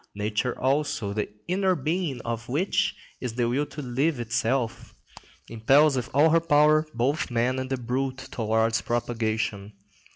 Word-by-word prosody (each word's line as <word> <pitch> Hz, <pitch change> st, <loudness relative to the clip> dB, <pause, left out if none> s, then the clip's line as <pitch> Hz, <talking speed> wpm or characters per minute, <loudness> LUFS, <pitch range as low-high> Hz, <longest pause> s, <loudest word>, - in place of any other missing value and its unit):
Nature 105 Hz, +4 st, -2 dB
also, 135 Hz, -6 st, 0 dB
the 105 Hz, 0 st, -2 dB, 0.2 s
inner 185 Hz, +1 st, +2 dB
being 155 Hz, -2 st, -2 dB
of 115 Hz, 0 st, -5 dB
which 160 Hz, +10 st, 0 dB, 0.2 s
is 125 Hz, -3 st, -4 dB
the 120 Hz, -1 st, +1 dB
will 140 Hz, +5 st, 0 dB
to 150 Hz, 0 st, -8 dB
live 135 Hz, +3 st, 0 dB
itself, 120 Hz, +1 st, -2 dB, 0.5 s
impels 135 Hz, +6 st, +4 dB
with 125 Hz, -2 st, -3 dB
all 150 Hz, +4 st, +4 dB
her 165 Hz, -, +5 dB
power 155 Hz, -1 st, +4 dB
both 135 Hz, +6 st, 0 dB
man 125 Hz, +2 st, 0 dB
and 130 Hz, 0 st, -4 dB
the 135 Hz, -, -1 dB
brute 130 Hz, +2 st, -2 dB
towards 110 Hz, 0 st, +1 dB
propagation. 110 Hz, -3 st, -2 dB
125 Hz, 150 wpm, -26 LUFS, 115-145 Hz, 0.5 s, her